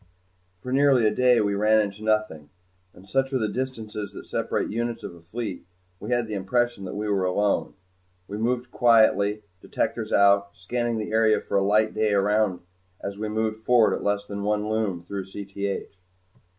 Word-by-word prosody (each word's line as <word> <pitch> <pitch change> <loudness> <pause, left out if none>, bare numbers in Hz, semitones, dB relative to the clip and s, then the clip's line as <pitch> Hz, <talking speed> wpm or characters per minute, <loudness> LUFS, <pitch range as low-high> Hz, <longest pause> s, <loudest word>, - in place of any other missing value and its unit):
For 125 - -5
nearly 135 -4 +4
a 105 - +3
day 125 0 +4
we 100 -1 0
ran 105 +2 +3
into 105 0 -2
nothing, 110 -9 -1 0.4
and 95 +1 -17
such 135 +6 0
are - - +3
the 110 -3 0
distances 110 -4 -5
that - - -9
separate - - -2
units 120 +1 -3
of - - -6
a 85 - -15
fleet, 100 +2 -6 0.4
we 105 - -7
had 120 -1 +1
the 110 - -6
impression 115 +2 -1
that 95 - -6
we 105 +1 -3
were 100 -2 +1
alone. 100 +3 0 0.5
We 105 - -6
moved 125 +2 -1
quietly, 110 -3 +3 0.2
detectors - - -2
out, 100 0 +3
scanning 120 +5 -2
the 110 -1 -4
area 110 -1 +3
for - - -5
a 100 - +3
light 105 +2 +2
day 110 -1 +1
around 100 -2 +1 0.4
as 100 0 -6
we 110 0 -3
moved 110 0 -1
forward 115 -1 +4
at - - -4
less 100 0 0
than 100 0 -6
one 105 +1 0
Lume 110 -5 -1
through 95 +2 -5
Cth. 100 0 -5
105 Hz, 185 wpm, -25 LUFS, 100-115 Hz, 0.5 s, nearly